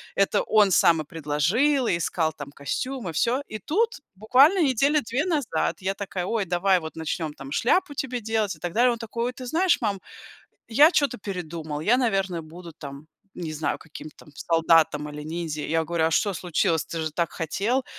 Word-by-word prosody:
это 195 - +2
он 210 -2 +3
сам 165 -2 +4
и - - -8
предложил, 170 - +1
и 175 - +1
искал 165 -1 -1
там 145 -2 -9
костюмы, 190 - -4
всё. 245 - +1
И 215 - -6
тут 435 - 0 0.2
буквально 275 - +4
недели 280 +3 +3
2 250 +6 -2
назад 305 -9 0
я 190 +1 -1
такая: 190 -2 -4
"Ой, 210 0 -1
давай 180 +1 +2
вот 160 -1 -8
начнем 160 0 -3
там 135 0 -10
шляпу 290 - +1
тебе 255 -3 -3
делать" 220 -2 -1
и - - -20
так 175 -1 -4
далее. 245 +2 +4
Он 235 - -5
такой: 230 +1 -4
"Ой, 250 - -2
ты 255 -1 -9
знаешь, 340 +7 +2
мам, 205 -5 -1 0.7
я 290 +7 +6
чё-то 280 -8 +1
передумал, 165 -6 -5
я, 235 +10 +3
наверное, 195 -8 0
буду 165 +1 -11
там, 140 +1 -10 0.3
не 160 -3 -5
знаю, 155 0 -2
каким-то 155 -1 -12
там - - -16
солдатом 165 -2 +2
или 150 0 -8
ниндзя". 160 -1 -4
Я 165 +2 0
говорю: 165 0 0
"А 160 - 0
что 200 +6 +1
случилось, 165 -2 0
ты 165 - -5
же 160 - -2
так 170 +1 -1
хотел?" 210 - -1
185 Hz, 195 wpm, -25 LUFS, 160-245 Hz, 0.7 s, я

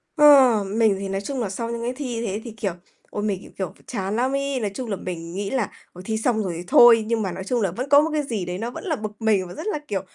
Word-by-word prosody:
Ờ, 270 -8 +7
mình 220 -4 +4
thì 195 -1 -4
nói 195 +1 -2
chung 270 +4 -4
nà 205 - -2
sau 230 +4 -4
những 235 0 -4
cái 245 +2 -2
thi 250 -4 -4
thế 205 +2 -3
thì, 235 - -7
kiểu, 210 -3 -3 0.4
ôi, 205 - -4
mình, 200 -3 -1
kiểu, - - -14
kiểu, 190 -2 -3
phải - - -23
chán 200 -3 -3
lắm 250 +3 +1
ấy. 275 -1 -1
Nói 205 -3 -2
chung 240 +2 -5
là 200 - -1
mình 170 -2 -6
nghĩ 195 +1 -3
là 255 -7 -1 0.2
"Ôi, 180 - -10
thi 220 -1 -1
xong 220 -1 +1
rồi 180 -3 -3
thì 175 - -6
thôi", 230 0 +7
nhưng 230 -1 0
mà 190 -3 -2
nói 190 - -6
chung 240 +4 -1
là 195 -4 +1
vẫn 250 +8 -5
có 285 +1 +7
một 315 - 0
cái 300 - +1
gì 220 -9 -3
đấy 180 0 -4
nó 230 +4 -4
vẫn - - -8
là 325 -6 -1
bực 215 -3 -5
mình 205 -5 +2
và 175 - -9
rất 410 - -6
là, 305 - -1
kiểu, 195 -5 -2
220 Hz, 315 wpm, -23 LUFS, 195-250 Hz, 0.4 s, Ờ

